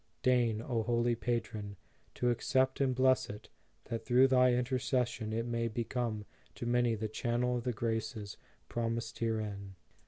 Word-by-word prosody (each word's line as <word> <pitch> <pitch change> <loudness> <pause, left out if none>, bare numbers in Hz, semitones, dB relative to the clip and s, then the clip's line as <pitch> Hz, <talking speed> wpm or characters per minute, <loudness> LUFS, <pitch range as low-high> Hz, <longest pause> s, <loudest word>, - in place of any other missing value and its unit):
Deign, 120 -3 +3
O 115 -2 0
Holy 120 +1 +1
Patron, 110 -4 -3 0.4
to 125 0 +2
accept 130 +3 +1
and 130 -2 +2
bless 130 0 +3
it, 105 +1 -9 0.4
that 115 - -4
through 125 +1 +5
thy 130 -1 +5
intercession 125 -2 0
it 115 +1 -1
may 115 -1 -1
be 115 +1 -2
come 115 -3 -2 0.3
to - - -5
many 120 -1 +2
the 110 0 -3
channel 120 +3 0
of 120 - -5
the 125 - +1
graces 115 -3 -3 0.3
promised 115 0 -3
herein. 105 -4 -2
120 Hz, 155 wpm, -33 LUFS, 110-125 Hz, 0.4 s, through